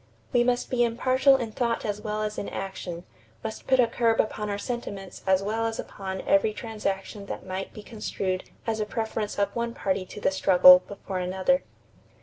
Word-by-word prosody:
We 240 -1 +5
must 245 0 0
be 245 -1 +3
impartial 255 +3 +4
in 240 -4 -2
thought 235 +1 -1
as 210 -1 -2
well 215 0 -2
as 210 0 -3
in - - -4
action, 180 -3 -5 0.4
must 220 - -6
put 260 -1 +4
a 245 - +7
curb 230 -1 +1
upon 210 -1 0
our 200 - -1
sentiments 205 -4 -5
as 190 0 +4
well 225 +3 0
as 225 - -3
upon 190 -1 -5
every 210 +2 +3
transaction 205 -2 -4
that - - -6
might 190 +1 -4
be 215 - -10
construed 195 -4 -3 0.2
as 225 -1 -1
a 215 - 0
preference 220 -1 -3
of 200 0 0
one 235 0 -2
party 190 -1 -1
to - - -9
the 195 - +2
struggle 180 -1 +8
before 195 -1 -5
another." 190 +9 +1
210 Hz, 190 wpm, -26 LUFS, 195-230 Hz, 0.4 s, struggle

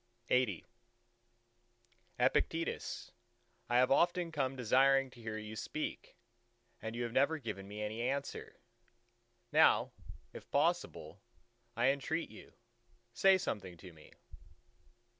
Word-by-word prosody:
LXXXI 125 -8 +2 1.5
"Epictetus, 165 +6 0 0.6
I 120 - +3
have 130 +1 +4
often 175 +3 +2
come 135 -4 -1
desiring 135 +2 +3
to 120 - -15
hear 110 -1 -4
you 110 0 -7
speak, 155 +7 -5 0.6
and 110 +1 -5
you 120 - -2
have 120 - -3
never 140 +6 +2
given 100 -9 -6
me 105 +1 -6
any 110 +2 -3
answer; 135 +3 -3 1.0
now - - +5 0.4
if - - -11
possible, - - -1 0.6
I 120 +3 +4
entreat 150 +4 -1
you, - - -13 0.6
say 190 +9 +5
something 95 - -4
to 90 0 -12
me." 75 -1 -17
125 Hz, 115 wpm, -34 LUFS, 110-140 Hz, 1.5 s, now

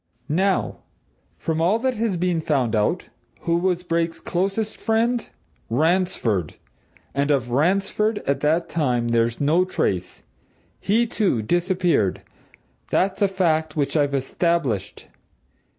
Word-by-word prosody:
Now, 190 +5 +1 0.6
from 160 0 -2
all 185 +6 +3
that 260 +2 0
has 220 -5 -1
been 175 -1 0
found 130 -8 0
out, 110 +12 0 0.3
who 170 0 +1
was 180 0 0
Brake's 165 -1 -1
closest 195 +4 -2
friend? 230 +2 0 0.4
Ransford! 140 - +1 0.6
And 140 +1 0
of 130 -4 +1
Ransford, 195 - +1
at 140 0 0
that 160 +4 +1
time, 125 -7 0
there's 115 0 +1
no 155 +5 +3
trace. 95 - -2 0.6
He, 225 +4 +2
too, 200 - 0
disappeared 175 - +1 0.7
that's 195 +2 +1
a 200 - +5
fact 165 -5 0
which 145 -1 -1
I've 145 -2 +2
established. 135 - -1
170 Hz, 120 wpm, -23 LUFS, 140-190 Hz, 0.7 s, a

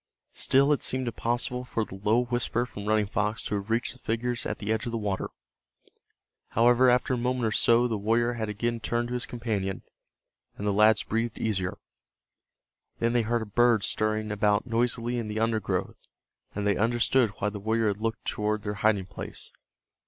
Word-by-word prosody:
Still 140 +2 +3
it 145 - -1
seemed 130 0 +1
impossible 120 +2 -1
for 115 -3 -2
the - - -12
low 105 +5 +2
whisper 120 0 0
from 105 -4 -8
Running 110 -1 +3
Fox 105 +2 -1
to - - -4
have 100 +1 -3
reached 115 +2 0
the 130 - -19
figures 120 +1 -2
at - - -3
the 110 0 -1
edge 110 +3 -2
of - - -3
the 115 - -1
water. 100 -3 -2 1.2
However, 120 +3 +4
after 125 +1 +2
a - - +1
moment 125 0 0
or 110 - +1
so 120 +3 +4
the 110 -3 -2
warrior 115 +3 +1
had 110 -2 -3
again 115 +3 -2
turned 120 +1 -1
to - - -4
his 125 0 -3
companion, 105 -6 -3 0.7
and 105 - -5
the 100 - +1
lads 105 +1 +5
breathed 115 +1 -2
easier. 95 -5 -1 1.2
Then 115 0 +1
they 120 - +3
heard 115 +1 0
a - - -6
bird 115 0 +3
stirring 110 +1 0
about 105 0 +2
noisily 120 0 0
in 115 - -4
the 105 +1 -3
undergrowth, 115 -1 -1 0.6
and 105 0 -2
they 100 -2 +2
understood 120 +2 +3
why 105 - 0
the 105 0 -7
warrior 110 +1 +1
had 100 - -2
looked 115 0 -2
toward 105 0 -1
their 105 - -2
hiding 105 -3 +2
place. - - -8
115 Hz, 190 wpm, -27 LUFS, 105-120 Hz, 1.2 s, lads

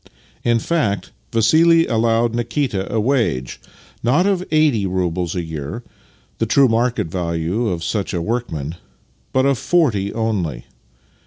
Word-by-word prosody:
In 120 -1 +3
fact, 115 - -1 0.2
Vassili 165 +9 +4
allowed 115 0 +1
Nikita 120 -4 -2
a 115 - +1
wage, 110 - 0 0.4
not 140 +10 +2
of 195 -3 +1
eighty 150 -10 +2
roubles 90 -1 -1
a 90 - -1
year 80 - -6 0.3
— - - -35
the 115 - 0
true 135 +4 +5
market 120 -1 +1
value 85 +5 -2
of 85 -5 -2
such 100 0 -2
a 90 - -1
workman 85 - -3 0.3
— - - -39
but 130 0 +2
of 140 -3 +2
forty 125 - +1
only. 95 - -2
115 Hz, 145 wpm, -20 LUFS, 90-125 Hz, 0.4 s, true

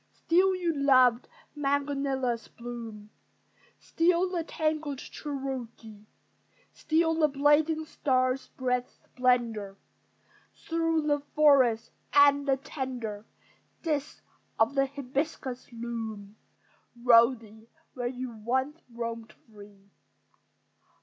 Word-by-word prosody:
Still 375 +3 +2
your 345 -3 -1
loved 255 -4 +4 0.3
magnolias 275 -4 -1
bloom, 230 -3 -9 0.7
Still 345 +2 +1
the 345 -3 -1
tangled 310 -3 -2
Cherokee; 250 -7 -7 0.7
Still 325 +1 +1
the 305 - +5
blazing 295 +3 +2
star 255 -4 +1
spreads 250 -2 -3
splendor 235 -6 -1 0.8
Through 330 -1 -1
the 290 -1 +2 0.2
forest, 270 -7 +4 0.2
and 285 0 +5
the 270 -1 +3
tender 245 -7 -6 0.6
Discs 300 -3 -3 0.3
of 225 +4 +3
the 275 -1 +2
hibiscus 270 -1 -4
loom, 225 -3 -6 0.6
Rosy, 230 -2 +3 0.2
where 245 -2 -3
you 250 0 -5
once 260 +7 -2
roamed 230 -1 -5 0.2
free. 200 -1 -16
260 Hz, 90 wpm, -28 LUFS, 230-290 Hz, 0.8 s, the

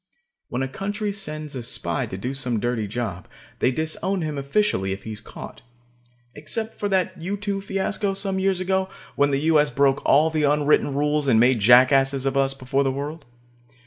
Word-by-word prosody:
When 125 +2 -2
a - - -1
country 205 +8 -3
sends 155 -7 -4
a 130 - -4
spy 115 - -1
to 95 - -6
do 125 +7 -4
some 125 -4 -1
dirty 120 -2 -1
job, 100 -5 -4 0.3
they - - +3
disown 160 +6 -1
him 155 -1 -3
officially 140 - 0
if 95 - -8
he 110 - -6
is 105 0 -7
caught. - - -10 0.7
Except 220 +10 -3
for 205 - -1
that 185 -2 0
U 195 +4 -3
2 200 -1 -2
fiasco 195 +1 -2
some 195 -1 -1
years 190 -1 +1
ago, 190 +1 0 0.3
when 145 0 +3
the 140 0 0
U.S. 150 -1 +3
broke 140 -1 +2
all 155 +3 +4
the 155 -1 0
unwritten 145 -1 +2
rules 150 0 0
and 115 -4 +4
made 120 0 +4
jackasses 130 +4 +5
of 135 0 0
us 135 0 +1
before 135 +1 0
the 135 - +1
world. 145 +3 -6
145 Hz, 190 wpm, -23 LUFS, 130-190 Hz, 0.7 s, jackasses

